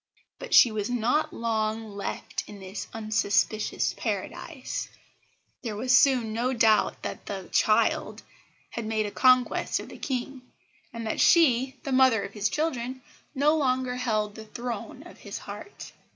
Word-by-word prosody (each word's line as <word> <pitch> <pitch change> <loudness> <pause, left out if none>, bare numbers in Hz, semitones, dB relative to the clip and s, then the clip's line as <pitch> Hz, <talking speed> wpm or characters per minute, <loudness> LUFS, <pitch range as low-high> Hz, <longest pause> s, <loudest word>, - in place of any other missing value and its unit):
But - - -1
she 240 - +8
was 215 0 -2
not 245 +5 +1
long 220 -1 -2
left 200 - -4
in 205 - -10
this 190 +1 -7
unsuspicious 215 -1 0
Paradise. - - -4 0.7
There 225 -5 -4
was 250 +4 +3
soon 250 -4 +4
no 245 +3 0
doubt 225 -3 +3
that - - -6
the - - -6
"child" - - +2 0.5
had 230 -2 -5
made 220 -1 0
a 205 - -4
conquest 255 0 +3
of - - -9
the - - -11
King, 260 0 -3 0.5
and 230 -1 -6
that 220 - -1
she, 265 -5 +4
the 275 - -4
mother 255 -5 +4
of 200 - -7
his 205 -1 0
children, 260 -3 -2 0.3
no 295 +3 +3
longer 255 -3 0
held 215 -4 -1
the 220 0 -10
throne 240 +2 -6
of - - -14
his - - -7
heart. 405 - -9
235 Hz, 150 wpm, -27 LUFS, 215-255 Hz, 0.7 s, she